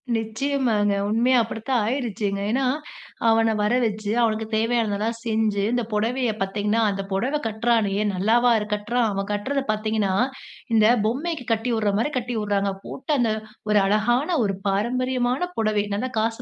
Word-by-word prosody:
நிச்சயமாங்க. 225 -2 0 0.2
உண்மையா 245 +4 +3
அப்பிடித்தான் 225 +2 -1
ஆயிருச்சுங்க. 220 -5 -2
ஏன்னா, 265 +3 +1 0.6
அவன 225 0 +3
வர 210 +3 +1
வச்சு, 215 -2 -2
அவனுக்கு 220 0 0
தேவையானதெல்லாம் 225 -1 0
செஞ்சு, 220 -3 +1
இந்த 245 - +1
புடவைய 235 +3 0
பாத்தீங்கன்னா 205 +3 0
அந்த 195 -1 -2
புடவ 245 +10 0
கட்றானே 220 -2 +1 0.2
நல்லாவா 230 +6 +3
இரு 210 - -3
கட்டுறான்? 230 +3 0
அவன் 195 0 -3
கட்றத 265 +7 -1
பாத்தீங்கன்னா, 215 -2 0 0.6
இந்த 220 -1 +5 0.2
பொம்மைக்கு 280 +4 -2
கட்டி 225 +2 0
விட்றமாரி 215 +5 0
கட்டி 245 0 -3
விட்றாங்க. 200 -1 0
போட்டு 285 - -5
அந்த 230 -3 +2 0.4
ஒரு 210 -1 +5
அழகான 240 - +1
ஒரு 195 -2 0
பாரம்பரியமான 250 - 0 0.2
புடவை 215 -2 +1
நல்ல 215 +6 -1
காசு 225 +1 -1
225 Hz, 140 wpm, -23 LUFS, 210-245 Hz, 0.6 s, இந்த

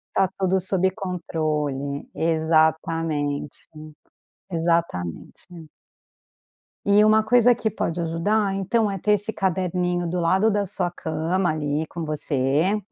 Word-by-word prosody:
Está 195 -1 +3
tudo 190 0 +1
sob 190 0 +1
controle, 155 -7 -3
exatamente, 160 -2 +1 1.0
exatamente. 165 - -3 1.2
E 205 +1 +5
uma 215 0 +4
coisa 245 +1 +5
que 225 -1 -1
pode 170 +1 -2
ajudar 195 +5 0
então 205 +2 +1
é 195 - -3
ter 210 +3 +2
esse 210 +2 0
caderninho 180 -2 -1
do 175 +1 -2
lado 190 +6 +3
da 205 0 0
sua 185 -2 -3
cama 175 +2 -1
ali 150 0 -2
com 170 +1 -6
você, 150 +4 0
175 Hz, 115 wpm, -23 LUFS, 160-195 Hz, 1.2 s, E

